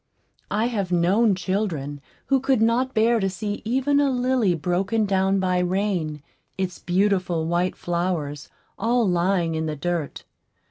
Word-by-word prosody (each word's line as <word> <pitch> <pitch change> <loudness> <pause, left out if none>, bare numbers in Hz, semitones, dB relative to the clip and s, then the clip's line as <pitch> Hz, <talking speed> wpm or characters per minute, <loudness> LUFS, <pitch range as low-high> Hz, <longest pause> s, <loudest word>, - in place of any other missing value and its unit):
I 215 +2 0
have 205 -7 -2
known 190 +5 +3
children 180 -8 -3 0.2
who 270 -1 +2
could 265 -2 +1
not 240 +4 +1
bear 230 +1 +3
to 195 -2 0
see 205 +2 -4
even 265 +5 +1
a 285 -1 +3
lily 250 -7 +1
broken 190 +6 0
down 195 0 +1
by 185 -1 +1
rain, 180 -5 -1 0.3
its 185 -1 -3
beautiful 180 -3 +1
white 175 +2 0
flowers 170 -5 -3 0.3
all 230 +1 +2
lying 175 -1 +1
in 160 0 -2
the 155 - -3
dirt. 170 0 -3
190 Hz, 145 wpm, -24 LUFS, 175-225 Hz, 0.3 s, known